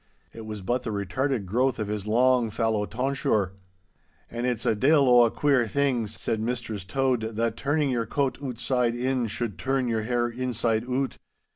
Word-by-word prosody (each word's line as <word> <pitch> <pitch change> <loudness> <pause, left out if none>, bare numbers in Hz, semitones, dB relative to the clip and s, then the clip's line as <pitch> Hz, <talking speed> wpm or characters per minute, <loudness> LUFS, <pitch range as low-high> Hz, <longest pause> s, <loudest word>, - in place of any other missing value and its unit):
It 110 -1 -9
was 105 -2 -6
but 120 +5 0
the 125 - -5
retarded 105 +4 -1
growth 125 +7 +1
of 110 - -3
his 105 -1 -4
long 125 +1 +3
fallow 110 -1 0
tonsure. 125 -6 0 0.8
'An' 120 +1 -3
it's 120 -3 -1
a - - +3
de'il 140 +5 +4
o' 120 -1 +7
a - - +2
queer 135 -2 +2
thing,' 130 -2 0
said 110 +1 -3
Mistress 115 -3 -3
Tode, 115 +1 -1
'that 115 0 0
turning 145 +2 0
your 115 -3 -1
coat 135 +1 -1
ootside 125 -2 -1
in 130 -1 0
should 110 -1 -4
turn 135 -1 0
your 115 -2 0
hair 120 +2 0
inside 120 -2 -1
oot! 130 +2 -2
120 Hz, 175 wpm, -26 LUFS, 110-130 Hz, 0.8 s, o